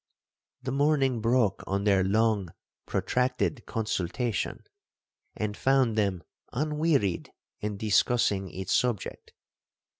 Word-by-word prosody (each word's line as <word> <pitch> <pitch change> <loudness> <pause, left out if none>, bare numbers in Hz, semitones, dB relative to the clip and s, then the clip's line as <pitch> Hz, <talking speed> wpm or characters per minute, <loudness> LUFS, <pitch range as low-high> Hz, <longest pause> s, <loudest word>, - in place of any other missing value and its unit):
The 130 - -2
morning 135 -3 +2
broke 115 -2 +2
on 100 +1 0
their 100 -2 +4
long 105 -1 +2 0.4
protracted 125 0 0
consultation, 110 0 -2 0.7
and 105 -1 -2
found 130 -3 +2
them 100 -5 0 0.3
unwearied 150 - 0 0.3
in 105 -1 -3
discussing 105 -2 +2
its 95 +1 -3
subject. 120 -6 -1
110 Hz, 95 wpm, -28 LUFS, 100-130 Hz, 0.7 s, their